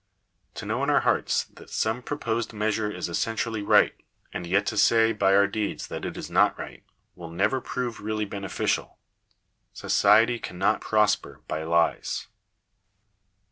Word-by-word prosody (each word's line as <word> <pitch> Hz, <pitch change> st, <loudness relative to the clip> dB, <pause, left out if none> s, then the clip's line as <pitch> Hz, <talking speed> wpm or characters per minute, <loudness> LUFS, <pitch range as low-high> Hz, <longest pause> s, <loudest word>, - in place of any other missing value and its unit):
To 105 Hz, -, -7 dB
know 110 Hz, +5 st, -2 dB
in 140 Hz, -, 0 dB
our 145 Hz, -, +4 dB
hearts -, -, +1 dB
that -, -, -17 dB
some 110 Hz, +3 st, -1 dB
proposed 120 Hz, -5 st, -3 dB
measure 105 Hz, 0 st, -1 dB
is 90 Hz, -4 st, -4 dB
essentially 110 Hz, +4 st, -2 dB
right, 100 Hz, -, +4 dB, 0.4 s
and 85 Hz, -, -5 dB
yet 100 Hz, +3 st, +2 dB
to 110 Hz, -, -3 dB
say 115 Hz, +1 st, +4 dB
by 95 Hz, -2 st, +3 dB
our 100 Hz, 0 st, +6 dB
deeds 105 Hz, +1 st, -3 dB
that -, -, -5 dB
it -, -, -5 dB
is -, -, -6 dB
not -, -, +3 dB
right, -, -, -9 dB, 0.3 s
will 85 Hz, -2 st, -10 dB
never 100 Hz, +10 st, 0 dB
prove 125 Hz, -2 st, -4 dB
really 110 Hz, 0 st, -2 dB
beneficial. 100 Hz, -2 st, -3 dB, 0.8 s
Society 110 Hz, +4 st, +3 dB
cannot 95 Hz, +3 st, -1 dB
prosper 105 Hz, -1 st, +1 dB
by 80 Hz, -, -3 dB
lies. 85 Hz, +1 st, 0 dB
105 Hz, 150 wpm, -26 LUFS, 95-115 Hz, 0.8 s, our